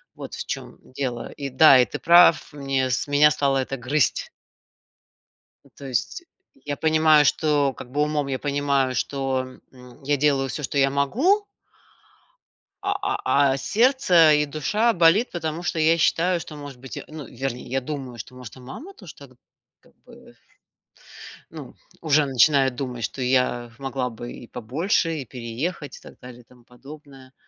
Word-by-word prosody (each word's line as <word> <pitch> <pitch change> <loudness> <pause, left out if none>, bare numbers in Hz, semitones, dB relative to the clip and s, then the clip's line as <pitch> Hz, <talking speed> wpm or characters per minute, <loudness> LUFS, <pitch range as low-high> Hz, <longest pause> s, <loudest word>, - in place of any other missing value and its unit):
Вот - - -9
в - - -6
чем - - -6 0.2
дело. 125 -4 -3
И 140 -1 -4
да, 135 0 +7
и 125 - +5
ты - - -6
прав, 170 -1 +5
мне 135 -2 -1
с 125 - -1
меня 145 +1 +5
стало 140 -2 +1
это 135 +1 -3
грызть. 130 +4 0 1.5
То 140 - -10
есть, 135 - -3 0.4
я 145 -1 -4
понимаю, 155 -1 +4
что, 145 -1 +1
как 125 - -11
бы 145 +2 0
умом 150 -2 -1
я 130 - -2
понимаю, 140 -2 0
что, 130 -1 -3
м, 125 +1 -16
я 145 +2 0
делаю 140 -1 +1
всё, 150 - -5
что 140 +1 -3
я 135 0 +3
могу 265 - +1 1.4
а - - 0 0.2
а 140 -1 +2
а - - 0
сердце 185 - +4
и 150 0 +1
душа 210 +11 0
болит, 175 +6 +3
потому 165 -1 -4
что 170 - -2
я 160 +1 +3
считаю, 175 +2 +1
что 150 - -9
может 145 -3 -10
быть, 130 -3 -9
ну, 155 -3 -9
вернее, 125 0 -5
я 135 +2 -1
думаю, 130 -3 -7
что 115 +4 -9
может 125 -1 -11
и - - -13
мама 135 - -10
тоже 185 - -13
так, 140 -2 -15 0.5
как - - -26
бы - - -17 1.1
ну, - - -11 0.3
уже 150 -2 +3
начинает 135 -1 +3
думать, 125 -3 -5
что 130 - -4
я, 125 -2 0
могла 135 -2 -3
бы 120 +1 -9
и 120 - -11
побольше, 160 - -1
и 135 - -6
переехать, 130 +7 -6
и - - -17
так - - -15
далее 125 -1 -12
и 120 - -26
тому 125 -1 -22
подобное. 135 +1 -15
140 Hz, 170 wpm, -23 LUFS, 130-155 Hz, 1.5 s, да